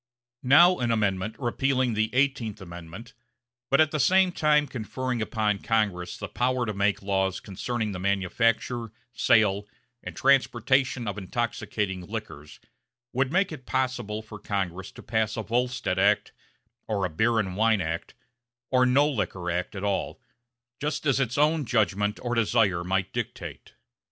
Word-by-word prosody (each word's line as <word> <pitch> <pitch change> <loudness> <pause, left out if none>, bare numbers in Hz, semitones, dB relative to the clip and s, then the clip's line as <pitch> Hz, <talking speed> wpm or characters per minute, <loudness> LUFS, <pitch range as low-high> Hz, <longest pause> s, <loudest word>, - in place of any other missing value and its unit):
Now 170 +8 +6
an 120 -1 0
Amendment 105 -2 0
repealing 130 0 0
the 110 +1 +1
Eighteenth 130 -6 0
Amendment 85 +5 -10 0.6
but 140 - +3
at 155 -1 +4
the 155 - -1
same 185 +6 +4
time 150 -3 +3
conferring 125 0 -4
upon 105 -1 0
Congress 100 -6 -1
the - - -5
power 125 0 0
to 105 - -3
make 100 0 0
laws 95 -1 0
concerning 110 +3 -3
the 95 - -5
manufacture, 110 +4 0 0.2
sale 105 -3 +3 0.3
and - - -8
transportation 130 -2 +2
of 100 0 -3
intoxicating 100 -2 -3
liquors, 105 -9 -7 0.5
would 130 +1 +1
make 185 +2 +2
it 135 -5 -9
possible 120 -5 -2
for 110 -1 -10
Congress 95 -2 -3
to - - -12
pass 110 -1 -1
a 110 - -2
Volstead 120 -5 -1
act, 100 +2 +3 0.6
or 100 -3 0
a - - -2
beer 110 +8 +2
and 95 -4 -1
wine 110 0 +3
act, 85 -1 -4 0.6
or 125 -1 +4
no 140 +4 +4
Liquor 95 - -2
act 90 +3 -3
at 95 - -5
all, 100 +4 -2 0.6
just 150 +2 -3
as 135 -2 +2
its 125 -1 -1
own 150 +1 +3
judgment 105 -4 0
or 120 -1 -1
desire 110 -6 +2
might 95 +1 -1
dictate. - - -6
110 Hz, 150 wpm, -26 LUFS, 100-130 Hz, 0.6 s, Now